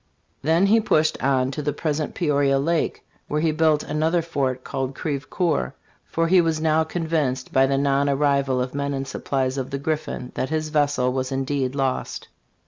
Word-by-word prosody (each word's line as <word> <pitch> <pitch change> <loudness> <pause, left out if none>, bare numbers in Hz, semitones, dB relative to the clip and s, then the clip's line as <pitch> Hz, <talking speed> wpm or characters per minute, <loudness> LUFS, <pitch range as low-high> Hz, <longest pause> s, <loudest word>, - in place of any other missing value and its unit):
Then 165 +6 +3
he 220 +3 +5
pushed 155 -6 +1
on 130 -1 +2
to 150 - -4
the 145 0 -1
present 150 0 -2
Peoria 140 -4 +2
lake, 160 +4 -1 0.2
where 150 - -1
he 160 0 +2
built 155 -1 +2
another 160 +3 0
fort 135 -6 -2
called 135 0 -3
Crevecoeur, 145 - -1 0.3
for 165 0 0
he 180 +1 +5
was 165 -2 0
now 160 0 +3
convinced, 160 -6 -2
by 135 0 +5
the 135 0 +1
non 140 0 +2
arrival 140 -2 +2
of 125 - -6
men 140 0 -2
and 135 0 -4
supplies 135 0 -2
of 130 0 -4
the 140 - -3
Griffin, 140 -3 -3
that 130 - -2
his 155 0 -1
vessel 145 -4 +1
was 130 0 -2
indeed 135 0 -1
lost. 135 -2 -2
145 Hz, 180 wpm, -23 LUFS, 135-155 Hz, 0.3 s, he